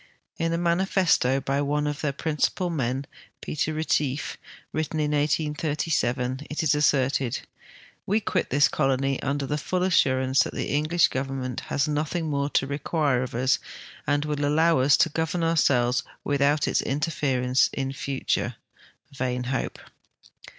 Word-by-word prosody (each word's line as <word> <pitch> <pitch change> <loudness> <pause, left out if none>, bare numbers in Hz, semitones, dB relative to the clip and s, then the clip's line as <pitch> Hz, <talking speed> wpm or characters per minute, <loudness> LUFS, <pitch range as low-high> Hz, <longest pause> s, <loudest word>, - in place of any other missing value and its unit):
In 165 0 0
a 165 - 0
manifesto 170 -6 +2
by 135 +1 -1
one 150 +1 0
of 145 0 -3
their 150 - 0
})rincipal 160 +5 -1
men, 130 -1 -1 0.3
Peter 155 +1 -2
Ketief, 150 -2 -1 0.4
written 155 0 -2
in 150 -1 0
1837 145 -3 0
it 150 - -2
is 155 - +3
a.sserted, 135 -4 +1 0.3
" - - -24
We 210 +3 +2
quit 190 -4 -1
this 140 0 +4
colony 135 0 0
under 140 +1 -1
the 150 +2 -2
full 180 +4 -1
assurance 130 -6 +3
that - - -2
tlie - - -3
English 155 +4 +3
government 130 -2 -3
has 140 0 +1
nothing 155 +2 -1
more 140 0 0
to 135 - +1
require 140 -1 0
of 125 -2 -5
us 130 +2 +2 0.5
and 145 0 +1
will 150 -1 -2
allow 160 +1 +3
us 135 +3 +5
to 165 - +3
govern 160 +2 -1
ourselves 130 -7 +2 0.2
without 145 0 +2
its - - +2
interference 135 -3 +1
in 135 -1 -3
the - - -5
future." 135 0 -2 0.6
Vain 125 -2 -2
hope! 130 - -2
145 Hz, 150 wpm, -25 LUFS, 135-155 Hz, 0.6 s, us